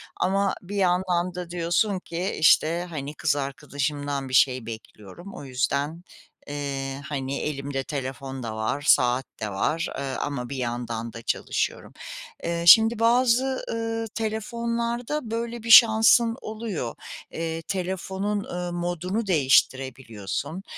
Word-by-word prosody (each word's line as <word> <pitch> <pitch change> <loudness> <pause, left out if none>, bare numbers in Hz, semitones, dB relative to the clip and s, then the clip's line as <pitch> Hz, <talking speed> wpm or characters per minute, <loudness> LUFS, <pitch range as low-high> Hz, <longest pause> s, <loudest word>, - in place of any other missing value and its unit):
ama 195 +1 +1
bir 190 +3 -8
yandan 180 -2 +1
da 180 -1 -5
diyorsun 175 +3 0
ki, 180 +2 -4
işte, 165 +2 +4
hani, 145 -3 -5
kız 150 -1 +1
arkadaşımdan 145 0 -3
bir - - -8
şey 130 -1 +4
bekliyorum, 110 - -10
o - - -8
yüzden, 140 +5 -1 0.4
eee, 140 -1 -4
hani, 140 -2 -3
elimde 140 -2 -3
telefon 135 -2 -5
da 110 -1 -4
var, 110 +6 -2
saat 125 +1 +4 0.2
de 105 - -2
var, 155 +12 -1
eee, 140 - -3
ama 135 -2 -3
bir 140 - -4
yandan 120 -2 -4
da 115 - -8
çalışıyorum. 115 - -2 0.5
Eee, 170 0 -2
şimdi 225 +4 +8
bazı, 250 +2 +3
ııı, 225 0 -2
telefonlarda 235 +3 -2
böyle 235 0 -3
bir 230 - -5
şansın 230 +1 +7
oluyor. 215 - -4 0.4
Eee, 165 0 -3
telefonun, 190 +3 -3
eee, 175 0 -4
modunu 175 +5 -2
değiştirebiliyorsun. 135 - 0
165 Hz, 125 wpm, -25 LUFS, 135-205 Hz, 0.5 s, şimdi